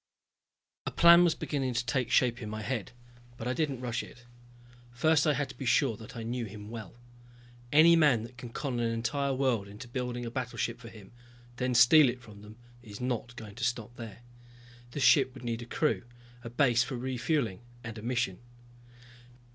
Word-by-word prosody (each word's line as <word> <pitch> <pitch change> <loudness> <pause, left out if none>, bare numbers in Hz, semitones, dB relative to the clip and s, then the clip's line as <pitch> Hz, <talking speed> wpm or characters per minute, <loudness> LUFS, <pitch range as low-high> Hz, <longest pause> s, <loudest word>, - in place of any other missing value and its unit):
A - - +2
plan 170 +1 +7
was 170 -2 +3
beginning 135 -4 -2
to 120 +1 0
take 125 -1 -1
shape 120 -1 +2
in 105 - -5
my 110 0 -5
head, 115 -2 -3 0.5
but 115 - -5
I 125 - 0
didn't 140 -4 -2
rush 120 -1 -2
it. 120 -1 -14 0.6
First 155 +6 +2
I 150 - +3
had 145 0 -1
to 130 - -10
be 130 - -7
sure 130 -2 +3
that 110 +3 -11
I 115 - -5
knew 120 +1 -3
him 105 +1 -10
well. 115 -2 -8 0.7
Any 160 +3 +7
man 145 -9 +4
that 120 +2 -10
can 120 0 -9
con 125 0 -3
an 115 -1 0
entire 140 +5 -1
world 125 -7 0
into 105 +5 -10
building 120 0 -4
a 115 - -5
battleship 120 -1 -3
for 115 -1 -10
him 105 -4 -14 0.5
then 125 -1 -1
steal 125 +5 +7
it 125 +1 -4
from 105 -3 -13
them 105 +1 -13 0.2
is 105 -4 -10
not 125 -1 -3
going 110 -4 -9
to 120 +3 -7
stop 120 -1 -2
there. 115 -1 -10 0.7
The 135 - -6
ship 135 -1 +4
would 130 - -11
need 115 -1 -3
a - - -7
crew, 155 +5 0 0.4
a 115 - -6
base 120 -1 +3
for 125 +1 -5
refueling 125 - -1 0.2
and 120 -3 -7
a - - -9
mission. 115 -6 -1
120 Hz, 195 wpm, -30 LUFS, 115-130 Hz, 0.7 s, plan